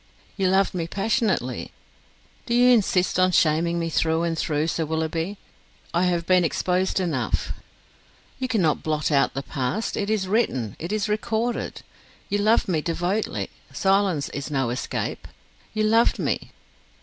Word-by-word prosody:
"You 195 -2 +1
loved 190 +1 +3
me 170 -3 -2
passionately!" 220 +6 0 0.8
"Do 235 - +1
you 250 +1 +6
insist 185 -5 +2
on 185 0 +4
shaming 170 +1 +2
me 165 -1 -2
through 160 +2 +1
and 170 -1 0
through, 150 -1 0
Sir 165 0 -1
Willoughby? 160 +4 -2 0.6
I 170 +2 +2
have 175 -2 0
been 185 0 +4
exposed 180 +3 0
enough." 150 -10 -1 0.9
"You 260 - -1
cannot 185 -11 +1
blot 155 -1 -1
out 140 -2 +2
the 135 - -3
past: 135 - -2
it 205 0 -2
is 210 -3 0
written, 135 - 0
it 170 +4 -5
is 215 0 0
recorded. 220 +3 -2 0.5
You 205 - 0
loved 215 +3 +3
me 165 -5 +1
devotedly, 175 +6 -2 0.2
silence 195 -6 +1
is 140 +1 -5
no 135 -5 0
escape. 125 - -3 0.4
You 215 -1 -1
loved 225 +2 +4
me." - - -2
180 Hz, 150 wpm, -24 LUFS, 160-205 Hz, 0.9 s, you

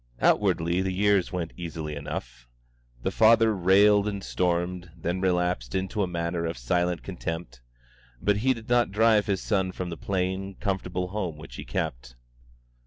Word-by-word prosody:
Outwardly 85 +2 +2
the 95 0 -1
years 100 -1 +2
went 85 -2 -3
easily 80 -3 -5
enough. 60 -4 -6 0.6
The - - 0
father 115 0 +5
railed 100 +3 +5
and 100 -2 -3
stormed, 90 0 -1
then 85 +3 -2
relapsed 90 -9 0
into 95 +3 -1
a 95 - +1
manner 85 -1 -2
of 80 - -4
silent 85 +8 0
contempt; 80 -8 -5 0.6
but 105 +7 +2
he 130 +5 +2
did 115 -1 -11
not 120 -3 +3
drive 110 0 +4
his 100 -2 0
son 95 -4 0
from 90 -1 -5
the 85 - -5
plain, 95 0 -2
comfortable 90 -2 -2
home 90 -6 -3
which 75 - -11
he - - -7
kept. - - -4
90 Hz, 160 wpm, -27 LUFS, 85-100 Hz, 0.6 s, father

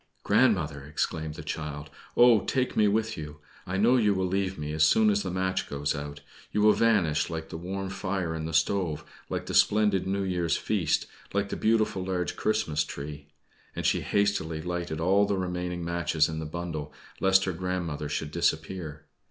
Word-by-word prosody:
"Grandmother!" 80 - +2
exclaimed 75 +1 -3
the 75 - -8
child, 75 -1 -5 0.3
"Oh, 120 -2 +7
take 130 -1 -1
me 105 - +4
with 110 +2 0
you! 75 -1 -7 0.3
I 90 +1 -2
know 120 +6 +4
you 105 -4 +3
will 95 0 0
leave 95 0 -1
me 75 0 -4
as 80 0 +3
soon 105 +7 +5
as 100 0 +1
the 95 - -3
match 95 +1 -1
goes 70 0 -1
out. 75 -1 -6 0.3
You 105 - +1
will 105 0 +7
vanish 90 -11 +2
like 80 -1 -5
the - - -6
warm 95 +3 -4
fire 95 -3 -2
in 80 -1 -4
the - - -4
stove, 80 -2 +1 0.3
like - - -3
the - - -5
splendid 105 -3 +3
New 100 +1 0
Year's 90 -3 0
feast, - - 0 0.3
like 100 0 +1
the - - -3
beautiful 110 -4 +1
large 90 -1 -2
Christmas 95 -9 0
tree!" 75 0 -7 0.5
And - - -4
she - - +2
hastily 100 -6 0
lighted 85 -1 -3
all 95 +4 +3
the 100 -1 0
remaining 90 -1 -3
matches 85 -2 +1
in 80 0 -4
the 80 - -4
bundle, 80 -2 -5 0.3
lest 95 0 +4
her 95 - -1
grandmother 85 -4 -3
should 75 0 -3
disappear. 80 -1 -2
90 Hz, 185 wpm, -28 LUFS, 80-100 Hz, 0.5 s, Oh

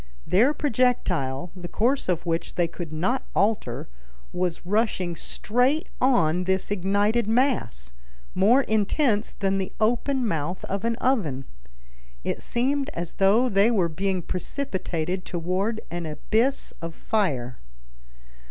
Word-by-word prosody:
Their 230 +10 +4
projectile, 185 - 0
the 175 -1 -7
course 245 +5 +1
of 175 -2 0
which 165 -1 -2
they 175 -1 +2
could 170 -1 -7
not 185 +12 0
alter, 210 +2 0 0.5
was 180 -1 -2
rushing 190 -3 0
straight 245 - 0
on 180 -9 +3
this 190 +1 0
ignited 205 +4 +1
mass, 220 - 0 0.4
more 230 +9 +4
intense 220 +1 +1
than 195 -1 0
the 190 - -3
open 245 +3 +1
mouth 170 0 -2
of 195 +1 -3
an 230 0 +1
oven. 190 - 0 0.8
It - - -2
seemed 275 +4 0
as 170 0 -4
though 205 +6 +4
they 200 -1 +4
were 190 -8 +2
being 185 +2 -1
precipitated 185 - -3
toward 185 +7 -2
an 170 -1 -3
abyss 220 - 0
of 165 0 -6
fire. 135 - -1
195 Hz, 125 wpm, -25 LUFS, 175-235 Hz, 0.8 s, Their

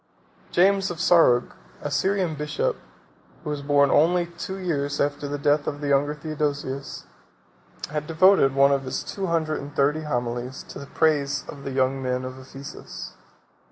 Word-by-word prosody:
James 195 +2 +3
of 175 - -5
Sarug, 165 -8 +4 0.3
a 145 - -3
Syrian 185 +3 +1
bishop, 155 - -1 0.7
who 150 - -3
was 145 -1 -3
born 140 -1 +3
only 175 +3 +4
two 170 +3 -7
years 145 -6 -2
after 145 0 -1
the 145 +1 -3
death 145 +1 +1
of 145 - -3
the 145 -1 -3
younger 145 +2 +2
Theodosius, 145 -3 -3 0.9
has 150 0 -2
devoted 165 -4 +4
one 140 0 +5
of 140 -1 +2
his 130 0 -3
two 195 -1 -4
hundred 160 -2 0
and 145 +1 -9
thirty 145 +3 +2
homilies 125 -2 -3
to - - -8
the 140 - -9
praise 145 -3 +1
of 140 -1 -9
the 135 - -3
young 135 0 +1
men 125 0 -2
of 130 +1 -7
Ephesus. 135 +1 -9
145 Hz, 165 wpm, -24 LUFS, 140-165 Hz, 0.9 s, one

